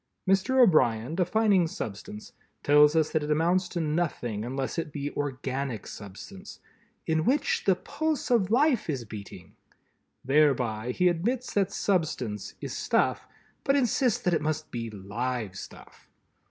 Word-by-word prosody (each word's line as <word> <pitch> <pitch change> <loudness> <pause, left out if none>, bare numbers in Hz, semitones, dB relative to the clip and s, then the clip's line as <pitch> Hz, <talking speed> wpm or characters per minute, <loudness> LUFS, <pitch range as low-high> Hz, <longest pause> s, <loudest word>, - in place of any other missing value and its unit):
Mr. 195 +8 +3
O'Brien, 145 - +4
defining 190 0 +2
Substance, 105 -5 -7 0.3
tells 150 +1 +6
us 160 -1 +2
that 155 - +1
it 150 - -4
amounts 170 +4 +2
to 175 - -3
nothing 150 -9 -1
unless 135 +6 -3
it 160 -2 -4
be 145 0 -4
organic 135 -3 -3
substance 185 - -10 0.5
"in 160 -1 +1
which 300 - +1
the 190 - +4
pulse 310 - -3
of 210 -6 +3
life 255 - +2
is 130 -6 -2
beating." 100 -4 -10 0.7
Thereby 125 -6 +2
he 180 +8 +2
admits 235 +9 -1
that 200 -1 +1
Substance 155 - -1
is - - -5
Stuff, - - 0 0.4
but 275 - +2
insists 250 -3 +2
that 180 - +2
it 160 - +1
must 155 0 -3
be 115 -1 -4
Live 110 +1 -4
Stuff! - - -12
155 Hz, 140 wpm, -27 LUFS, 125-195 Hz, 0.7 s, tells